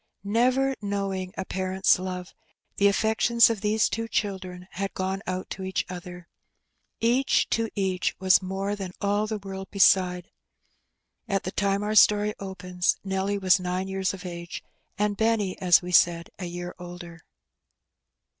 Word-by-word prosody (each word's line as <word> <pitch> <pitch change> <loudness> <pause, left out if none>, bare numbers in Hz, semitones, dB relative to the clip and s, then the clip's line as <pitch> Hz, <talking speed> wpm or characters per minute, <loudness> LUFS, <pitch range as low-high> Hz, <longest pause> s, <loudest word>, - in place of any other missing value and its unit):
Never 255 +6 +2
know 200 -1 -2
ing 185 -1 -4
a 190 - -3
parent's 190 0 +1
love, 185 -1 -5 0.4
the 200 - +5
affections 220 +3 +4
of 215 -3 -4
these 215 +1 +2
two 225 0 -3
children 185 -4 -3
had 195 +2 -4
gone 190 +1 -2
out 185 0 -3
to 190 - -5
each 190 0 -2
other. 180 -1 -8 0.7
Each 245 +4 +2
to 230 -1 +1
each 190 -2 -1
was 185 0 +5
more 195 +2 -3
than 190 -3 -6
all 205 +1 0
the 215 0 -2
world 195 -1 -8
beside. 185 -3 +3 1.0
At 195 -1 0
the 185 - -4
time 200 0 0
our 210 +1 -1
story 210 0 +5
opens 180 -2 -1
Nelly 195 +1 -1
was 190 0 +4
nine 180 +1 -2
years 190 0 -1
of 195 -1 -9
age, 170 -1 -7 0.3
and 210 0 0
Benny, 220 -3 +1
as 180 -1 +5
we 180 - -5
said, 170 -1 +3
a 185 - -4
year 175 0 -6
older. 175 -1 -9
190 Hz, 155 wpm, -26 LUFS, 180-205 Hz, 1.0 s, the